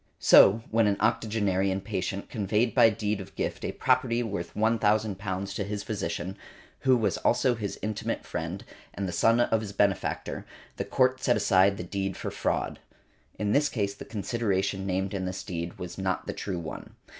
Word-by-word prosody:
So, 110 Hz, +3 st, +7 dB
when 115 Hz, -1 st, +4 dB
an 100 Hz, -1 st, +1 dB
octogenarian 100 Hz, -4 st, +1 dB
patient 95 Hz, -1 st, -3 dB
conveyed 110 Hz, +3 st, 0 dB
by 120 Hz, -3 st, +7 dB
deed 105 Hz, -2 st, -2 dB
of 95 Hz, -, -12 dB
gift -, -, -3 dB
a -, -, -1 dB
property 120 Hz, -1 st, +1 dB
worth 105 Hz, -3 st, -5 dB
£1,000 105 Hz, -3 st, 0 dB
to 100 Hz, -, -1 dB
his 100 Hz, +1 st, -4 dB
physician, 95 Hz, -2 st, -3 dB, 0.4 s
who 130 Hz, -1 st, +4 dB
was 105 Hz, -6 st, 0 dB
also 125 Hz, -, +2 dB
his 105 Hz, -4 st, -4 dB
intimate 105 Hz, -1 st, -3 dB
friend, -, -, -4 dB, 0.3 s
and 100 Hz, 0 st, -2 dB
the -, -, -3 dB
son 115 Hz, +7 st, +3 dB
of 110 Hz, -2 st, +2 dB
his 100 Hz, -2 st, -6 dB
benefactor, 100 Hz, -1 st, 0 dB, 0.3 s
the -, -, -2 dB
Court 130 Hz, 0 st, +2 dB
set 120 Hz, -, +3 dB
aside 100 Hz, 0 st, +4 dB
the 90 Hz, -, -4 dB
deed 95 Hz, +1 st, -3 dB
for -, -, -4 dB
fraud. -, -, -1 dB, 0.6 s
(In 105 Hz, -1 st, -1 dB
this 145 Hz, +5 st, +3 dB
case 100 Hz, -4 st, -1 dB
the -, -, -9 dB
consideration 100 Hz, -3 st, -1 dB
named 95 Hz, +1 st, -1 dB
in 95 Hz, -2 st, -2 dB
this 90 Hz, +1 st, -4 dB
deed 85 Hz, -2 st, -5 dB
was 90 Hz, +1 st, -7 dB
not 95 Hz, -1 st, -1 dB
the -, -, -3 dB
true 95 Hz, -3 st, -4 dB
one.) 80 Hz, -2 st, -7 dB
100 Hz, 180 wpm, -28 LUFS, 95-110 Hz, 0.6 s, So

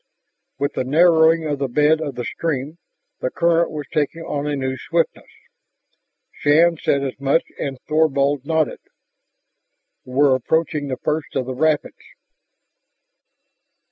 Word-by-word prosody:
With 140 Hz, +1 st, -1 dB
the -, -, -1 dB
narrowing 160 Hz, +3 st, +4 dB
of 145 Hz, -2 st, -2 dB
the 140 Hz, -, 0 dB
bed 150 Hz, +5 st, +2 dB
of 145 Hz, -3 st, -4 dB
the 120 Hz, -, -4 dB
stream, 155 Hz, +2 st, -3 dB, 0.4 s
the 130 Hz, -, -1 dB
current 170 Hz, +3 st, +2 dB
was 150 Hz, -2 st, -6 dB
taking 155 Hz, +2 st, -1 dB
on 145 Hz, -2 st, -3 dB
a 145 Hz, -, -1 dB
new 130 Hz, -1 st, -2 dB
swiftness. 165 Hz, +5 st, -2 dB, 1.0 s
Shann 165 Hz, +3 st, +3 dB
said 140 Hz, 0 st, +1 dB
as 135 Hz, -1 st, -5 dB
much 140 Hz, +4 st, +2 dB, 0.2 s
and 135 Hz, -2 st, -3 dB
Thorvald 145 Hz, -3 st, +1 dB
nodded. 160 Hz, 0 st, 0 dB, 1.2 s
"We're 135 Hz, +2 st, +3 dB
approaching 150 Hz, +2 st, 0 dB
the 130 Hz, -2 st, -3 dB
first 155 Hz, -1 st, -3 dB
of 130 Hz, -, 0 dB
the 130 Hz, -, -4 dB
rapids." 150 Hz, +2 st, 0 dB
150 Hz, 135 wpm, -21 LUFS, 135-160 Hz, 1.2 s, narrowing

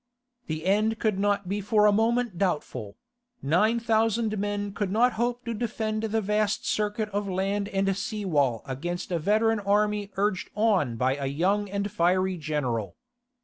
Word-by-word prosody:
The 155 Hz, 0 st, -4 dB
end 215 Hz, +3 st, +2 dB
could 215 Hz, -4 st, 0 dB
not 200 Hz, -1 st, +1 dB
be 200 Hz, +2 st, -2 dB
for 210 Hz, +1 st, +3 dB
a 210 Hz, -, +6 dB
moment 225 Hz, -2 st, +1 dB
doubtful; 150 Hz, -, -2 dB, 0.5 s
nine 210 Hz, +11 st, +3 dB
thousand 225 Hz, -1 st, +1 dB
men 205 Hz, 0 st, -2 dB
could 200 Hz, -2 st, -2 dB
not 240 Hz, +4 st, +3 dB
hope 240 Hz, +2 st, -2 dB
to 235 Hz, -, -2 dB
defend 215 Hz, -1 st, -2 dB
the 220 Hz, 0 st, 0 dB
vast 210 Hz, 0 st, 0 dB
circuit 210 Hz, +1 st, 0 dB
of 205 Hz, 0 st, -2 dB
the -, -, -3 dB
land 200 Hz, +2 st, -1 dB
and 195 Hz, 0 st, 0 dB
sea 210 Hz, +1 st, -4 dB
wall 140 Hz, -, +1 dB
against 175 Hz, +8 st, -4 dB
a 170 Hz, -, 0 dB
veteran 220 Hz, +5 st, +2 dB
army 205 Hz, 0 st, +1 dB
urged 200 Hz, -2 st, 0 dB
on 200 Hz, -, +2 dB
by 130 Hz, +4 st, +1 dB
a 140 Hz, -1 st, -2 dB
young 190 Hz, +8 st, 0 dB
and 200 Hz, +1 st, -2 dB
fiery 185 Hz, +2 st, +2 dB
general. 130 Hz, -, -2 dB
205 Hz, 170 wpm, -27 LUFS, 180-215 Hz, 0.5 s, a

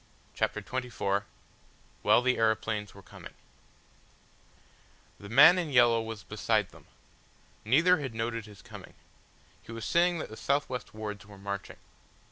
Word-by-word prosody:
CHAPTER 105 Hz, -, -2 dB
XXIV 100 Hz, -4 st, -2 dB, 0.8 s
WHILE -, -, +4 dB
THE 125 Hz, -1 st, +1 dB
AEROPLANES 110 Hz, -2 st, -1 dB
WERE 100 Hz, -, -14 dB
COMING -, -, -13 dB, 1.8 s
The 100 Hz, -, -11 dB
man 150 Hz, -, +7 dB
in 170 Hz, -3 st, -3 dB
yellow 120 Hz, -3 st, +4 dB
was 110 Hz, -2 st, -7 dB
beside 105 Hz, -2 st, 0 dB
them. -, -, -18 dB, 0.8 s
Neither 165 Hz, +10 st, +4 dB
had 135 Hz, -6 st, -6 dB
noted 115 Hz, -1 st, -3 dB
his 105 Hz, -2 st, -15 dB
coming. -, -, -12 dB, 0.7 s
He -, -, -13 dB
was 115 Hz, -1 st, -6 dB
saying 175 Hz, +1 st, +2 dB
that -, -, -5 dB
the 110 Hz, -, -10 dB
south 140 Hz, +1 st, 0 dB
west 125 Hz, -4 st, -7 dB
wards 105 Hz, -2 st, -7 dB
were 100 Hz, -1 st, -13 dB
marching. 100 Hz, 0 st, -6 dB
115 Hz, 140 wpm, -29 LUFS, 105-130 Hz, 1.8 s, man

